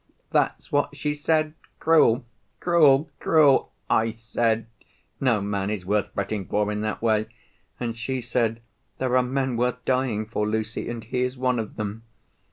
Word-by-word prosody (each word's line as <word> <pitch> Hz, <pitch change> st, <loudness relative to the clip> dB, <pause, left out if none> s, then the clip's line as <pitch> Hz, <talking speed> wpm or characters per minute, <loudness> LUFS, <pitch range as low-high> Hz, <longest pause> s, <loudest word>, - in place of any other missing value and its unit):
That's -, -, 0 dB
what 145 Hz, 0 st, 0 dB
she 150 Hz, +1 st, -1 dB
said. 155 Hz, +1 st, +1 dB, 0.3 s
Cruel, 140 Hz, -8 st, +4 dB, 0.3 s
cruel, 155 Hz, -4 st, +4 dB
cruel. 150 Hz, -4 st, +4 dB, 0.2 s
I 115 Hz, +1 st, +2 dB
said, 115 Hz, 0 st, -1 dB, 0.5 s
'No 125 Hz, -6 st, +2 dB
man 100 Hz, -1 st, -2 dB
is 105 Hz, -4 st, -3 dB
worth 105 Hz, +1 st, 0 dB
fretting 100 Hz, -1 st, -2 dB
for 105 Hz, 0 st, 0 dB
in 105 Hz, 0 st, -2 dB
that 110 Hz, +1 st, -3 dB
way.' 110 Hz, -1 st, +2 dB, 0.5 s
And 115 Hz, -2 st, -3 dB
she 130 Hz, +3 st, -3 dB
said, 115 Hz, -1 st, -1 dB, 0.3 s
'There 130 Hz, -1 st, 0 dB
are 130 Hz, -, +6 dB
men 130 Hz, -1 st, -1 dB
worth 125 Hz, +1 st, -1 dB
dying 125 Hz, -5 st, 0 dB
for, 105 Hz, -1 st, -2 dB
Lucy, 110 Hz, +1 st, -2 dB
and 120 Hz, -1 st, -5 dB
he 125 Hz, +2 st, -2 dB
is 125 Hz, +1 st, -1 dB
one 125 Hz, -1 st, +1 dB
of 110 Hz, -, -5 dB
them. 105 Hz, +1 st, -4 dB
115 Hz, 165 wpm, -25 LUFS, 110-130 Hz, 0.5 s, are